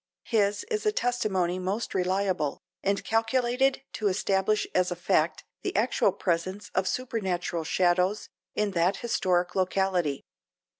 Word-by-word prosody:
His 205 -2 +1
is 425 -1 0
a - - +5
testimony 195 - 0
most 195 +5 -2
reliable, 185 -4 0 0.2
and 200 0 0
calculated 250 +4 +1
to 215 - -1
establish 195 +1 +1
as 180 0 +2
a 175 - -2
fact 170 -3 +1 0.2
the - - -3
actual 215 -1 +3
presence 185 +2 -2
of 190 0 +1
supernatural 185 -7 -2
shadows 180 +4 +1 0.3
in 210 -1 +1
that 180 +1 +2
historic 180 -5 +1
locality. 185 -6 0
190 Hz, 130 wpm, -28 LUFS, 180-215 Hz, 0.3 s, a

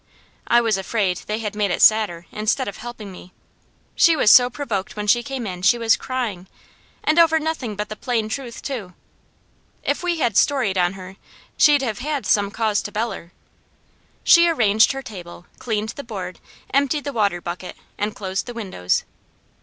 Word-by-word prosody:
I 240 0 +5
was 225 -4 +1
afraid 190 -2 -1
they 215 - -1
had 215 -2 -4
made 210 -1 0
it 175 - -1
sadder, 210 -6 +4
instead 220 +5 -1
of 200 - -6
helping 235 -4 -8
me; 180 0 -13 0.6
she 335 -2 +5
was 215 -8 +5
so 245 -1 +7
provoked 220 -8 -4
when 210 0 -4
she 240 +4 +4
came 265 -1 -5
in 180 -3 -6
she 195 +6 +4
was 230 -1 +3
crying, 225 -8 -4 0.6
and 310 +2 +3
over 325 -1 +5
nothing 305 -9 -3
but 210 +1 -3
the 215 - -5
plain 230 -2 -1
truth 235 +1 -6
too; 210 -10 -5 0.9
if - - -1
we 355 -1 -1
had 240 -9 0
storied 255 -9 +2
on 180 0 +2
her, 190 0 -10 0.4
she'd 290 -2 +5
have 220 -5 -3
had 290 +1 -3
some 200 -1 +2
cause 215 -1 0
to 205 - -7
beller. 210 -6 -4 0.9
She 340 0 +6
arranged 220 -8 +4
her 270 0 -6
table, 175 -6 -10
cleaned 220 -2 -2
the 280 +5 -7
board, 190 -7 -7 0.3
emptied 280 +2 +1
the 285 - -4
water 205 -6 +1
bucket, 175 +1 -7 0.2
and 210 +1 -2
closed 190 +1 -4
the 245 - -7
windows. 185 - -1
220 Hz, 180 wpm, -21 LUFS, 195-255 Hz, 0.9 s, so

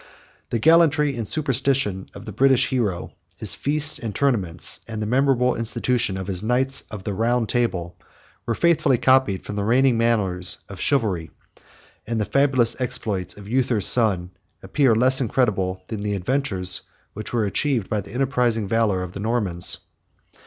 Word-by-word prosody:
The 120 - -1
gallantry 150 0 +3
and 115 -3 -4
superstition 135 -8 0
of 100 - -10
the 110 - -7
British 130 +4 +3
hero, 110 -9 -2 0.3
his - - +1
feasts 150 +1 0
and 110 -3 -6
tournaments, 100 -11 0
and 110 -1 -6
the 105 - -2
memorable 125 +1 +2
institution 115 -2 0
of 95 - -5
his 95 -1 -4
Knights 130 +4 +1
of 105 -3 -8
the 100 - -3
Round 115 +3 0
Table, 90 -9 -2 0.5
were 115 - 0
faithfully 160 -5 +2
copied 130 -6 +2
from 105 - -6
the 100 - -1
reigning 125 +2 +2
manners 95 -6 0
of 100 -2 -10
chivalry; 105 - 0 0.8
and 115 0 -2
the 105 - 0
fabulous 135 -3 +1
exploits 105 -7 -1
of 100 -1 -11
Uther's 120 -4 0
son 95 -7 +3 0.3
appear 120 +4 +2
less 130 +4 +5
incredible 95 -7 -1
than 110 -3 -5
the 105 0 -2
adventures 95 -3 -1 0.3
which 110 - -7
were 115 -3 0
achieved 120 +1 -1
by 105 -3 -2
the 100 - -13
enterprising 125 -4 0
valor 105 -4 0
of 90 - -7
the 95 - -8
Normans. 100 -6 +1
115 Hz, 160 wpm, -22 LUFS, 100-130 Hz, 0.8 s, less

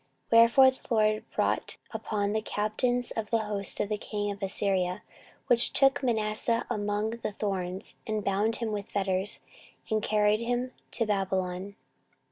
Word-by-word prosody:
14:033:011 230 - +8
Wherefore 260 +3 +7
the 260 - -16
LORD 215 0 +2
brought - - 0
upon 220 -2 -3
them 200 +1 0
the 220 - 0
captains 240 +4 -1
of 225 -2 -3
the 230 - +3
host 210 -3 -1
of 205 - 0
the 210 -1 -1
king 205 -1 -3
of 200 0 -8
Assyria, 190 -2 0 0.4
which 235 0 +3
took 270 0 +4
Manasseh 230 -1 +1
among 210 +1 -1
the 230 -2 -4
thorns, 190 -2 -4
and 215 -1 -1
bound 205 +3 +2
him 230 -2 -2
with 205 -1 -4
fetters, 195 0 -1 0.5
and 215 0 +2
carried 210 0 +2
him 245 +2 -1 0.2
to 230 - 0
Babylon. 190 -1 -1
210 Hz, 160 wpm, -29 LUFS, 200-230 Hz, 0.5 s, 14:033:011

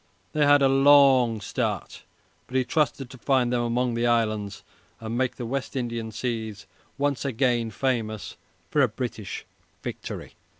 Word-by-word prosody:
They 150 -1 +3
had 145 -1 +6
a - - +6
long 135 -4 +5
start, 100 - -3 0.5
but 130 - -9
he 130 - +2
trusted 140 0 0
to 130 - -12
find 125 -1 +2
them 120 - +2
among 120 +1 0
the 120 +1 +1
islands 110 -3 0 0.4
and 115 0 -5
make 130 0 0
the 120 - -5
West 135 +3 -3
Indian 115 -3 -3
seas 110 -2 -4 0.3
once 140 -2 0
more 120 -3 +1
famous 110 -2 -2 0.4
for 150 - +3
a 135 - +5
great 110 - -18
British 115 -5 -5 0.4
victory. - - -6
120 Hz, 160 wpm, -26 LUFS, 115-135 Hz, 0.5 s, had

